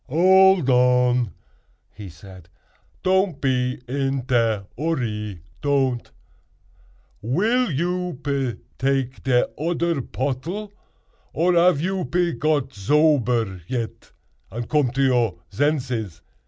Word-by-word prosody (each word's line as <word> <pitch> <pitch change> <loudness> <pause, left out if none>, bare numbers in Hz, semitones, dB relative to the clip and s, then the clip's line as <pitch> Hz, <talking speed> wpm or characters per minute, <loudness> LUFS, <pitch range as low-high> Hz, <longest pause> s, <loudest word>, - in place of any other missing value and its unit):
"Old 190 +1 +5
on!" 125 -2 +3 0.6
he 105 -3 -9
said; 90 0 -14 0.5
"don't 185 -4 +1
pe 125 -2 0
in 135 0 -1
te 115 -5 +1
urry—don't. 120 - -2 1.1
Will 215 - +1
you 175 +1 -2
pe 135 -4 -1 0.2
take 135 -1 -1
de 125 -2 +2
odder 170 -1 0
pottle, 155 - -4 0.6
or 175 +3 +2
ave 170 -3 +4
you 190 0 -1
pe 175 +5 0
got 150 -4 0
zober 120 - +1
yet 115 -2 -5 0.4
and 115 0 -5
come 150 -4 +2
to 135 +3 0
your 120 -8 +2
zenzes?" 125 - -1
135 Hz, 100 wpm, -22 LUFS, 120-165 Hz, 1.1 s, Old